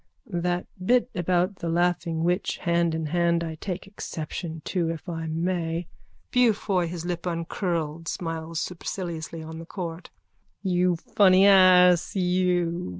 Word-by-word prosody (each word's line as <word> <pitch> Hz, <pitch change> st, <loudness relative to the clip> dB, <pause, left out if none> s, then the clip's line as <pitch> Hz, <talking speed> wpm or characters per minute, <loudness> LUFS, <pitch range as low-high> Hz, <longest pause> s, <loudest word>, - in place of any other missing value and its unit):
_ 175 Hz, -, 0 dB
That 180 Hz, 0 st, 0 dB, 0.2 s
bit 250 Hz, +5 st, +3 dB
about 180 Hz, +2 st, 0 dB
the 170 Hz, -, -4 dB
laughing 170 Hz, -1 st, 0 dB
witch 180 Hz, +3 st, 0 dB
hand 170 Hz, -1 st, +2 dB
in 160 Hz, -1 st, -2 dB
hand 170 Hz, +1 st, +1 dB
I 160 Hz, -1 st, -4 dB
take 185 Hz, -2 st, -4 dB
exception 165 Hz, -4 st, -6 dB
to, 175 Hz, -3 st, 0 dB
if 165 Hz, +2 st, -6 dB
I 165 Hz, -2 st, -4 dB
may... 165 Hz, +1 st, -1 dB, 0.5 s
BEAUFOY: 210 Hz, -7 st, +2 dB
(His 170 Hz, 0 st, -6 dB
lip 175 Hz, 0 st, -3 dB
upcurled, 165 Hz, -2 st, -2 dB
smiles 165 Hz, -1 st, -4 dB
superciliously 170 Hz, -2 st, -5 dB
on 160 Hz, 0 st, -8 dB
the 165 Hz, -, -8 dB
court.) 170 Hz, -2 st, -6 dB, 0.5 s
You 180 Hz, -2 st, +2 dB
funny 185 Hz, +2 st, +4 dB
ass, 180 Hz, -3 st, +6 dB
you! 180 Hz, -, +1 dB
175 Hz, 140 wpm, -26 LUFS, 165-180 Hz, 0.5 s, ass